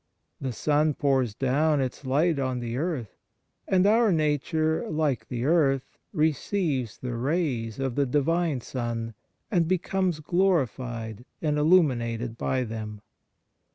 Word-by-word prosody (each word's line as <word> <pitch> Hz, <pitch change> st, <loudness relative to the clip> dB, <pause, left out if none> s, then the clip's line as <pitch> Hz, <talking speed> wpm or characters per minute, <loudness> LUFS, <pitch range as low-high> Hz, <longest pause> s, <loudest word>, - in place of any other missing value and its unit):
The 135 Hz, -2 st, -3 dB
sun 150 Hz, +5 st, +1 dB
pours 130 Hz, -6 st, +1 dB
down 145 Hz, +4 st, +2 dB
its 130 Hz, +1 st, -3 dB
light 150 Hz, +4 st, +2 dB
on 130 Hz, -2 st, -1 dB
the 120 Hz, -1 st, -4 dB
earth, 140 Hz, -, -3 dB, 0.5 s
and 185 Hz, 0 st, +3 dB
our 220 Hz, +1 st, +4 dB
nature, 155 Hz, 0 st, 0 dB
like 145 Hz, -8 st, 0 dB
the 120 Hz, 0 st, -3 dB
earth, 140 Hz, -4 st, +1 dB
receives 155 Hz, -, 0 dB
the 125 Hz, -1 st, -5 dB
rays 125 Hz, -4 st, -1 dB
of 135 Hz, -2 st, -2 dB
the 140 Hz, +2 st, +1 dB
Divine 150 Hz, +1 st, +1 dB
Sun 115 Hz, -2 st, -4 dB, 0.4 s
and 170 Hz, -5 st, +2 dB
becomes 185 Hz, -1 st, 0 dB
glorified 130 Hz, -, 0 dB, 0.2 s
and 150 Hz, -2 st, 0 dB
illuminated 125 Hz, -8 st, +2 dB
by 130 Hz, +2 st, -1 dB
them. 110 Hz, -2 st, -6 dB
140 Hz, 125 wpm, -26 LUFS, 120-160 Hz, 0.5 s, our